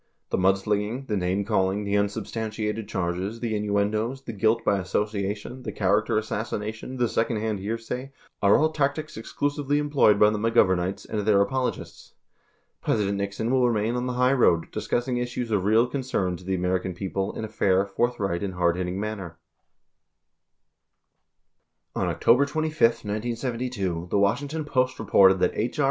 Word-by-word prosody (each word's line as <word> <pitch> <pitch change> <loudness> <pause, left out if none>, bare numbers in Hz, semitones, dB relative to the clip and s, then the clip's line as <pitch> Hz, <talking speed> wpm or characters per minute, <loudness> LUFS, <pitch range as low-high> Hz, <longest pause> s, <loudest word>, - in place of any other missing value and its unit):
The - - +1
mudslinging, 105 +6 +1
the 110 - -2
name 95 +1 0
calling, 100 -1 +1
the 100 0 -1
unsubstantiated 105 +1 -2
charges, 95 +3 -2
the 115 -2 -2
innuendoes, 105 +5 -1
the 115 - -6
guilt 110 +2 +1
by 100 -1 +2
association, 105 +5 -3
the - - -5
character 105 +3 +1
assassination, 110 +3 -4
the 120 -1 +2
second 115 0 0
hand 105 -1 -2
hearsay 115 +6 -4 0.3
are 100 0 +5
all 155 +1 +2
tactics 155 +1 -1
exclusively 145 +5 -1
employed 145 -8 +3
by 105 0 +6
the 105 - -2
McGovem 105 -5 +3
ites 95 +2 -3
and 110 - -3
their 105 -1 +3
apologists. 125 +6 -2 0.7
President 100 -1 0
Nixon 100 +4 -2
will 130 -2 +3
remain 110 0 0
on 125 +1 -2
the 125 - -2
high 125 +1 +4
road, 85 -11 +3
discussing 120 +1 -1
issues 120 -1 -3
of 100 -3 +1
real 110 +3 +4
concern 125 -8 -2
to 90 - -12
the 95 +1 -1
American 90 0 -1
people 95 +1 -3
in 110 - -3
a - - -6
fair, 95 -2 +2
forthright, 100 -5 -1
and 95 -2 -3
hardhitting 90 +1 0
manner 100 -5 -5 0.9
.* - - -53
On - - 0
October 130 +5 +3
25, 155 +1 -3
1972, 115 -4 -1
the - - +1
Washington 140 +10 0
Post 130 -2 0
reported 95 -3 +5
that - - +2
H. 120 +6 -2
R. - - -5
105 Hz, 160 wpm, -25 LUFS, 100-125 Hz, 0.9 s, by